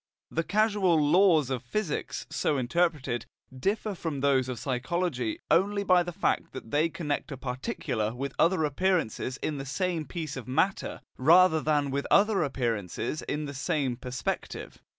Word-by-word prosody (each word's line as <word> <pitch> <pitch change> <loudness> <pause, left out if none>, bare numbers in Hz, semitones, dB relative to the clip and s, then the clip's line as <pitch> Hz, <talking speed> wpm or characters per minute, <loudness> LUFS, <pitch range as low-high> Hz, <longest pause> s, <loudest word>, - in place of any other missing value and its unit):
The 165 - 0
causal 205 -3 +2
laws 155 -2 +4
of 130 -3 -1
physics, 160 - -3
so 145 - 0
interpreted, 130 -3 0 0.3
differ 205 +9 -1
from 160 -6 -4
those 135 -2 +2
of 125 - -3
psychology 175 - -1
only 200 +3 +3
by 185 -2 +5
the 175 0 -3
fact - - -1
that 110 - -8
they 155 +3 +2
connect 155 -3 -3
a 135 - -5
particular 125 - -3
with 135 +2 -4
other 170 -1 +3
appearances 150 - 0
in 150 -2 -2
the - - -4
same 170 +2 -1
piece 155 0 -5
of 130 -4 -7
matter, 160 +9 0 0.2
rather 160 +3 +6
than 145 -2 +1
with 140 +1 -2
other 200 -1 +4
appearances 120 - -2
in 150 +1 -3
the 140 - -6
same 135 -2 -1
perspective. 125 +1 -5
150 Hz, 155 wpm, -28 LUFS, 130-180 Hz, 0.3 s, rather